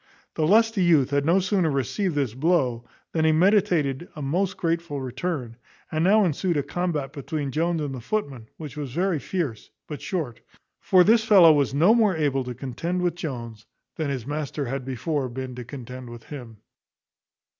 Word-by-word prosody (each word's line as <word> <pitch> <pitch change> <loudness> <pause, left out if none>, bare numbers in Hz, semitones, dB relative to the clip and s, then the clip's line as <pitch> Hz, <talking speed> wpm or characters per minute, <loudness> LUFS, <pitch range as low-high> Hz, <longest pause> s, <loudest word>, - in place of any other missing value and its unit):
The 155 - 0
lusty 225 0 +4
youth 155 -6 +4
had 140 +1 +1
no 175 +4 +4
sooner 190 -3 +1
received 150 - -1
this 135 -6 0
blow, 130 -5 +1 0.3
than 160 - 0
he 160 - +4
meditated 170 -4 +2
a 150 - -7
most 180 +8 -1
grateful 165 -3 -1
return; 130 -2 -4 0.3
and 155 +1 0
now 205 +3 +5
ensued 170 +1 0
a 145 - +1
combat 150 -2 -2
between 145 -1 -4
Jones 165 +3 0
and 145 -2 -3
the 130 - -6
footman, 135 - -3
which 150 -5 -8
was 145 -4 -5
very 175 0 0
fierce, 145 - -4 0.2
but 150 - -7
short; 155 - -3 0.4
for 185 -1 +5
this 220 +3 +4
fellow 190 -7 +7
was 140 -2 +1
no 170 +9 +5
more 215 -5 +3
able 140 -4 +1
to 125 -1 -5
contend 165 +9 -3
with 175 -2 +1
Jones 120 -10 -7 0.3
than 155 -3 -2
his 130 -5 -3
master 145 0 -3
had 135 +1 -3
before 135 +1 -2
been 130 +1 -6
to 125 0 -7
contend 125 0 -9
with 120 -1 -10
him. 120 -7 -9
150 Hz, 180 wpm, -25 LUFS, 130-175 Hz, 0.4 s, fellow